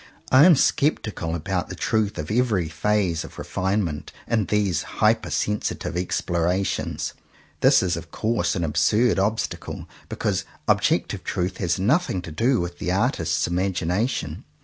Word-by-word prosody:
I 130 +4 +8
am 180 -3 +8
sceptical 110 - 0
about 90 +1 -2
the - - -6
truth 105 -3 0
of 75 +2 -4
every 110 -7 +1
phase 90 0 0
of - - -11
refinement 95 -5 -2 0.2
in 110 -3 +1
these 100 -6 +1
hyper - - +1
sensitive 105 -4 -2
explorations. 90 +1 -1 0.5
This - - +5
is 90 -2 0
of 85 - -8
course 110 -6 0
an 85 - -1
absurd 90 +9 +2
obstacle, 105 +3 -2 0.2
because - - -1 0.2
ob - - +4
jective - - 0
truth 90 +1 -2
has 85 -3 0
nothing 110 - +1
to 85 - -8
do 120 - +2
with 85 0 -4
the 90 - -1
artist's 115 +8 +1
imagination. 95 +5 -1
95 Hz, 145 wpm, -24 LUFS, 85-110 Hz, 0.5 s, I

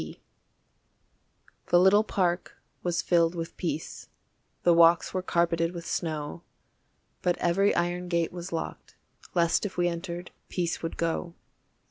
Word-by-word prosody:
P. - - -8 1.5
The 175 - +5
little 195 +4 +6
park 180 -4 -1 0.3
was 170 -1 -1
filled 170 -1 +3
with 165 -1 -5
peace, 160 -3 -4 0.6
The 175 - +5
walks 170 0 +5
were 185 - 0
carpeted 170 -1 +1
with 170 -1 -6
snow, 155 -1 -3 0.8
But 175 -1 +1
every 195 +4 +2
iron 175 +1 -1
gate 170 -2 0
was 175 +1 -7
locked. 165 -1 -5 0.4
Lest 170 -1 +3
if 205 -3 -4
we 175 0 +3
entered, 175 0 -5 0.2
peace 175 -2 -2
would 165 - -4
go. 170 +1 -2
175 Hz, 135 wpm, -28 LUFS, 165-180 Hz, 1.5 s, little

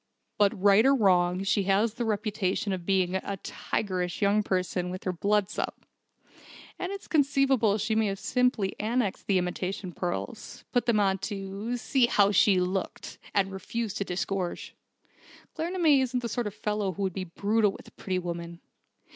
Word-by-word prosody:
But 200 -2 +3
right 200 +2 +6
or 275 +2 +5
wrong, 185 -4 +3
she 195 +1 +2
has 205 +3 +2
the 240 0 -3
reputation 205 -2 -1
of 180 -2 -5
being 190 -1 +2
a 195 +1 -4
tigerish 180 -4 -2
young 205 +1 +3
person 185 -2 -1
when 185 - -4
her 185 - +1
blood's 205 +2 0
up. - - -4 0.9
And 365 +1 -3
it's 395 -1 -7
conceivable 275 - +3
she 215 +1 -1
may 215 -3 +1
simply 250 -2 +1
have 215 +3 -2
annexed 240 -6 -1
the 195 - +3
imitation 180 +1 -3
pearls: 180 +7 -5
put 245 - +1
them 225 -3 +3
on 195 -1 +2
to 200 +4 -4
'see 250 +1 +2
how 200 -3 +4
she 195 -1 +5
looked,' 185 +1 -3 0.2
and 195 -1 +2
refused 205 +3 -4
to - - 0
disgorge! 185 -1 -3 0.8
Claremanagh 325 -4 +3
isn't 250 -1 -1
the 235 - -2
sort 235 0 -2
of 205 - -7
fellow 210 -2 -1
who 200 - -4
would 190 -2 -1
be 185 +1 -4
brutal 205 +4 +1
with - - -12
a - - -14
pretty 185 -1 -3
woman." 170 -1 -5
200 Hz, 170 wpm, -28 LUFS, 185-225 Hz, 0.9 s, right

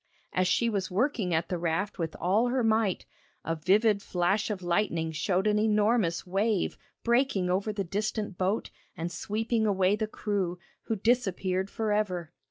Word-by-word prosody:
As 185 0 +2
she 235 +5 +2
was 200 -4 -1
working 210 -1 0
at 165 0 0
the 180 - -2
raft 175 +4 -1
with 165 -2 -2
all 205 +7 +2
her 250 0 +1
might, 220 -4 +1 0.4
a 165 - 0
vivid 200 +6 +3
flash 195 +4 0
of 200 -4 -4
lightning 170 -2 0
showed 180 +5 0
an 210 0 +3
enormous 210 -4 +2
wave 195 +2 0 0.3
breaking 235 -7 +2
over 195 +4 0
the 205 -1 -2
distant 210 +2 -2
boat 190 +4 -1 0.3
and 170 +1 -3
sweeping 220 +6 -1
away 190 -1 +3
the 215 0 -2
crew, 200 -5 -2 0.3
who 225 - -1
disappeared 195 -4 0
for 220 0 -2
ever. 180 -6 -1
200 Hz, 165 wpm, -29 LUFS, 180-215 Hz, 0.4 s, vivid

